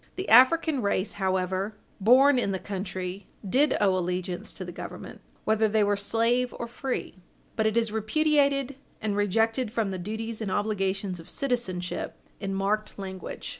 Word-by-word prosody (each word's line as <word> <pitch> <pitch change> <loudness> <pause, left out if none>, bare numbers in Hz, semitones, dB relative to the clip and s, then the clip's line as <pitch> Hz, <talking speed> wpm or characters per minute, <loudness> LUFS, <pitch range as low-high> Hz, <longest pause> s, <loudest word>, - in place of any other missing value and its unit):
The 380 - -4
African 270 +4 +6
race, 200 -1 0
however, 190 +2 0 0.2
born 255 +6 +6
in 200 - 0
the - - 0
country, 190 -1 -5 0.2
did 275 +9 +3
owe 195 -2 +3
allegiance 180 +2 -2
to 185 - -7
the 175 - -6
Government, - - -8 0.2
whether 220 0 +3
they 215 0 +2
were 205 0 +2
slave 230 +5 +1
or - - -3
free, 240 -5 -4 0.3
but 220 -1 +2
it 220 +1 0
is 225 -2 +1
repudiated, 280 +3 +1 0.2
and 210 -2 -1
rejected 225 +4 +1
from 220 -4 -1
the 185 - -4
duties 220 +4 -4
and 210 - -2
obligations 195 -2 -1
of 165 - -12
citizenship 210 -10 -2 0.2
in 195 -1 -3
marked 210 +2 -1
language. 190 -2 -6
210 Hz, 160 wpm, -27 LUFS, 190-240 Hz, 0.3 s, African